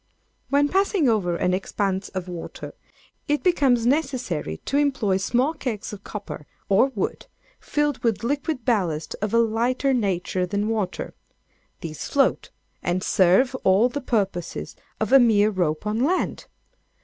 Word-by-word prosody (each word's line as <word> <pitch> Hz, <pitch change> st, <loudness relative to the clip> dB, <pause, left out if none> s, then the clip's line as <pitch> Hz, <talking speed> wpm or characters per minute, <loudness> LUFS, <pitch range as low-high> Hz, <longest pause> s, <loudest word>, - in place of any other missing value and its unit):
When 285 Hz, +1 st, +3 dB
passing 385 Hz, -2 st, +2 dB
over 195 Hz, -7 st, +1 dB
an 180 Hz, +1 st, 0 dB
expanse 195 Hz, 0 st, -2 dB
of 185 Hz, -1 st, -5 dB
water, 175 Hz, -2 st, -7 dB, 0.5 s
it 295 Hz, 0 st, 0 dB
becomes 270 Hz, -10 st, +3 dB
necessary 250 Hz, -, -1 dB
to 280 Hz, -, 0 dB
employ 260 Hz, -10 st, +1 dB
small 245 Hz, +10 st, +1 dB
kegs 230 Hz, -9 st, -4 dB
of 205 Hz, -1 st, -9 dB
copper 200 Hz, -8 st, -7 dB, 0.2 s
or 200 Hz, +7 st, +5 dB
wood, 195 Hz, -, -3 dB, 0.3 s
filled 295 Hz, -2 st, -1 dB
with 230 Hz, -2 st, 0 dB
liquid 285 Hz, 0 st, -2 dB
ballast 180 Hz, -, 0 dB
of 210 Hz, -1 st, -1 dB
a 230 Hz, -, +3 dB
lighter 235 Hz, +4 st, +1 dB
nature 185 Hz, -5 st, 0 dB
than 205 Hz, +3 st, -1 dB
water. 210 Hz, -5 st, -2 dB, 0.7 s
These 155 Hz, -2 st, -6 dB
float, 280 Hz, -1 st, +1 dB, 0.3 s
and 180 Hz, +1 st, -1 dB
serve 195 Hz, +7 st, +4 dB
all 195 Hz, +6 st, +4 dB
the 285 Hz, +3 st, -4 dB
purposes 195 Hz, -8 st, -2 dB, 0.2 s
of -, -, -1 dB
a 270 Hz, -, +9 dB
mere 215 Hz, -3 st, +4 dB
rope 175 Hz, -3 st, -1 dB
on 210 Hz, +1 st, -1 dB
land. 355 Hz, +7 st, -1 dB
220 Hz, 145 wpm, -24 LUFS, 190-270 Hz, 0.7 s, a